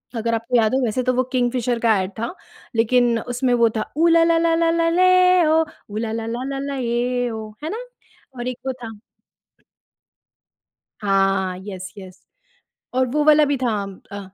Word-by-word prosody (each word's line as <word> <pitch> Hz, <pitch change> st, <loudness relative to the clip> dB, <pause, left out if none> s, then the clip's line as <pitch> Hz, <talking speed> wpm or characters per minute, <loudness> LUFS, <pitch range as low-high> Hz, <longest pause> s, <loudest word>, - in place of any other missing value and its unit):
अगर 230 Hz, +1 st, -1 dB
आपको 230 Hz, +2 st, 0 dB
याद 220 Hz, +2 st, +2 dB
हो 265 Hz, -, +1 dB
वैसे 240 Hz, +3 st, -1 dB
तो 255 Hz, -, +1 dB
वो 255 Hz, +1 st, +1 dB
किंगफिशर 245 Hz, -1 st, 0 dB
का 225 Hz, -2 st, +3 dB
एड 185 Hz, -, -4 dB
था, 235 Hz, +6 st, -3 dB, 0.4 s
लेक़िन 235 Hz, +1 st, +3 dB
उसमें 245 Hz, +1 st, -1 dB
वो 235 Hz, -1 st, +4 dB
था 215 Hz, -, -4 dB
ऊ 330 Hz, +2 st, +4 dB
ला 335 Hz, 0 st, +5 dB
ला 330 Hz, 0 st, +3 dB
ला 330 Hz, 0 st, +2 dB
ला 330 Hz, 0 st, +2 dB
ले 365 Hz, 0 st, +4 dB
ओ 320 Hz, +1 st, +4 dB, 0.3 s
ऊ 205 Hz, -, -6 dB
ला 220 Hz, 0 st, -2 dB
ला 225 Hz, 0 st, -3 dB
ला 255 Hz, +4 st, -4 dB
ला 280 Hz, 0 st, -4 dB
ये 245 Hz, 0 st, -1 dB
ओ 220 Hz, -1 st, -6 dB
है 310 Hz, -, -3 dB
ना? 450 Hz, +6 st, -5 dB, 0.5 s
और 240 Hz, -, -4 dB
एक 255 Hz, -1 st, -4 dB
वो 260 Hz, -, 0 dB
था। 225 Hz, -2 st, -8 dB, 2.0 s
हाँ, 195 Hz, -2 st, +1 dB
येस 190 Hz, -2 st, -7 dB
येस 190 Hz, -1 st, -11 dB, 0.7 s
और 255 Hz, 0 st, +2 dB
वो 300 Hz, +3 st, +1 dB
वाला 305 Hz, 0 st, +6 dB
भी 285 Hz, -, 0 dB
था 245 Hz, -3 st, 0 dB, 0.4 s
अ, 200 Hz, -, -5 dB
245 Hz, 185 wpm, -21 LUFS, 225-295 Hz, 2.0 s, वाला